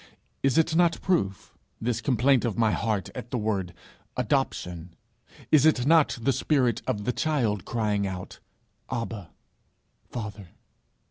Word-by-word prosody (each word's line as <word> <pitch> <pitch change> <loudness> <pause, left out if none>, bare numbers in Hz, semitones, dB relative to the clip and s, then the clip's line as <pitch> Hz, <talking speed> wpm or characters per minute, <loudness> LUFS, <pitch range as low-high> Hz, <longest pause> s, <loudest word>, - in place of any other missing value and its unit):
Is 135 +2 +2
it 160 0 +3
not 170 -1 +3
proof 100 - 0 0.3
this 120 0 -1
complaint 130 0 +3
of 115 -6 -1
my 110 -2 +3
heart 105 -6 -1
at 120 - -7
the 125 - -2
word 100 -5 -1 0.5
Adoption? 85 -1 -1 0.6
Is 150 -3 +6
it 155 -6 +4
not 160 -2 +4
the 130 +4 +1
spirit 125 -4 +1
of 105 - -1
the 125 - 0
child, 120 - 0
crying 105 -3 0
out, 90 -1 -7 0.5
"Abba, 115 -7 -4 0.8
Father"?' 105 -4 -6
115 Hz, 135 wpm, -27 LUFS, 100-135 Hz, 0.8 s, Is